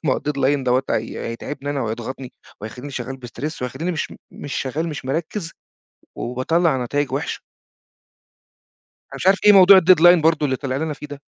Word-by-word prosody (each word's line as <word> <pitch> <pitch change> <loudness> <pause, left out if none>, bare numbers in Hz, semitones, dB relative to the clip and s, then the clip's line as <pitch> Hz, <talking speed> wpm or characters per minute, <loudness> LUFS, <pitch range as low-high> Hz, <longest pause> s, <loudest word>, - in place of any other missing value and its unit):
ما 135 - +2
هو - - -3
الdeadline 140 -1 0
دَوّة 125 +1 +2
هي 110 - -3
هيتعبني 140 +5 -6
أنا، 145 -1 -2
وهيضغطني، 120 +3 -5 0.3
وهيخلّيني 125 +7 -8
شغال 130 +1 -5
بstress 145 +3 -6
وهيخلّيني 145 +8 -3
مش 160 - -3
م - - -11 0.2
مش 145 - -7
شغال 150 +5 -2
مش 150 -4 -6
مركّز، 165 +6 -3 0.7
وباطَلّع 130 +2 0
نتايج 145 +3 -2
وِحْشَة. - - -3 1.7
أنا - - -10
مش - - -3
عارف 195 +1 +5
إيه 210 - +9
موضوع 195 -1 +8
الdeadline 175 -1 +6
برضه 160 -2 +3
اللي 130 -2 0
طلع 130 -1 -3
لنا 155 +1 -2
فيه 150 0 -10
ده؟ 145 -1 -10
145 Hz, 175 wpm, -21 LUFS, 130-165 Hz, 1.7 s, إيه